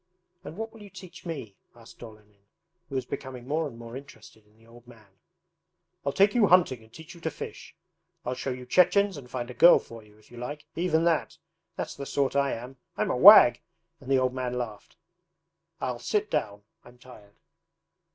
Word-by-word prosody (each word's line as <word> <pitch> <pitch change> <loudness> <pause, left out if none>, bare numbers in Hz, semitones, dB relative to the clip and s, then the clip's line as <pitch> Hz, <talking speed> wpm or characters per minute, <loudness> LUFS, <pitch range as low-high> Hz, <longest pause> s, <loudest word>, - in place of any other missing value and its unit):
'And 165 - -9
what 225 0 -6
will 225 - -14
you 205 - -12
teach 185 -2 -12
me?' 130 -12 -7 0.2
asked 115 0 -17
Olenin, 105 -3 -15 0.4
who 135 - -7
was 130 - -2
becoming 130 -2 -7
more 155 +2 -1
and 120 -5 -11
more 115 0 -10
interested 110 -5 -13
in 105 +1 -29
the 115 - -23
old 120 +1 -18
man. 105 -5 -19 0.8
'I'll 140 - -1
take 200 +6 +3
you 230 -4 +4
hunting 175 -10 +3
and 110 0 -20
teach 160 +7 -12
you 170 - -15
to 160 - -2
fish. - - -9 0.5
I'll 125 - -2
show 130 +2 -5
you 125 -1 -6
Chechens 195 +7 +3
and 135 -4 -11
find 125 -1 -5
a - - -9
girl 170 +7 +7
for 115 -1 -10
you, 105 0 -21
if 110 +1 -24
you 120 - -13
like 145 +5 -7
even 165 -2 +1
that! 165 -2 0 0.4
That's - - -5
the 140 0 -8
sort 140 -1 -1
I 140 -1 +1
am! 125 +3 -8 0.2
I'm - - 0
a - - 0
wag!' - - +9 0.4
and 135 - -12
the 135 - +4
old 130 -1 +1
man 125 -1 -3
laughed. 110 -4 -7 0.8
'I'll 125 -2 -3
sit 210 - -1
down. 100 -1 -2 0.2
I'm 120 0 -17
tired. 115 -5 -16
130 Hz, 200 wpm, -27 LUFS, 115-160 Hz, 0.8 s, wag